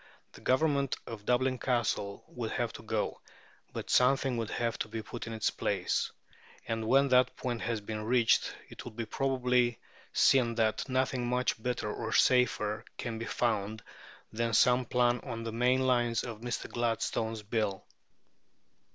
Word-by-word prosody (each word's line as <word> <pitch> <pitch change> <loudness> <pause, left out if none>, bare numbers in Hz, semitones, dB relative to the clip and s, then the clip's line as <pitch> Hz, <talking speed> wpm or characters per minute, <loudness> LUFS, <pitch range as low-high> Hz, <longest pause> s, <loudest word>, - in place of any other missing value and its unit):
The - - -14
government 140 0 +2
of 105 -3 -8
Dublin 130 +1 +2
Castle 115 -5 -1
would 120 -2 -4
have 120 -2 -1
to - - -9
go, 110 -1 -2 0.5
but - - -5
something 135 0 +3
would 115 -1 -2
have 115 -1 -2
to - - -2
be 110 0 -5
put 120 +2 -7
in 115 - -5
its 110 - 0
place; - - -1 0.6
and 115 -1 -2
when 135 +3 +4
that 125 0 +4
point 120 -2 -3
has 115 -2 -2
been 105 +1 -5
reached 120 +1 +3 0.2
it - - -10
will 120 - -8
probably 125 -1 +2
be 120 - -13 0.3
seen 120 -4 +4
that 110 +3 0
nothing 130 -1 0
much 125 -2 0
better 120 -3 -2
or 110 -1 -4
safer 115 -4 +3
can 115 -2 -4
be 115 - -4
found 110 -3 -1 0.5
than 115 +1 -1
some 125 0 +4
plan 120 0 +2
on 115 0 -6
the 115 - -4
main 125 +3 +2
lines 120 -3 +2
of 115 -3 -7
Mr. 120 0 -3
Gladstone's 115 -2 -1
Bill. 105 -3 -1
120 Hz, 160 wpm, -31 LUFS, 110-125 Hz, 0.6 s, when